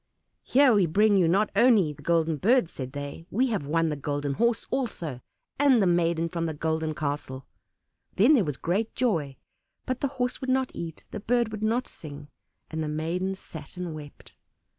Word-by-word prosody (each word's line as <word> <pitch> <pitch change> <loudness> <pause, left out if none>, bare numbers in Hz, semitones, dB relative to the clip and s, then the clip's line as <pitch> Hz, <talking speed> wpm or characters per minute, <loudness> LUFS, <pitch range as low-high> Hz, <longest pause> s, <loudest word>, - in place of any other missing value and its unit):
"Here 265 -1 +4
we 200 -5 +4
bring 205 +5 +4
you 180 -4 +4
not 200 +5 +2
only 215 -11 +4
the 145 - -15
Golden 165 0 +1
Bird," 225 - +3
said 130 -1 -7
they; 145 +3 -7
"we 250 +7 +1
have 200 -11 -2
won 165 +2 +1
the 150 - -2
Golden 145 0 -2
Horse 235 +8 +1
also, 170 - -3 0.4
and 280 -4 +5
the 200 - +3
maiden 170 -1 +2
from 170 -1 -2
the 160 - -4
Golden 160 0 -1
Castle." 140 -3 -4 0.7
Then 240 +3 +5
was 150 -5 -2
there - - -36
great 200 +7 -1
joy; 165 - 0 0.5
but 255 0 -2
the 280 - 0
Horse 250 0 -1
would 260 - -3
not 260 0 +1
eat, 165 -2 -7
the - - -5
Bird 235 +1 +1
would 215 -1 -6
not 230 +4 +1
sing, 145 -1 -10 0.4
and 160 0 -3
the - - -3
maiden 170 +5 -2
sat 160 -3 -11
and 180 -2 -4
wept. 150 -2 -11
170 Hz, 190 wpm, -27 LUFS, 150-225 Hz, 0.7 s, and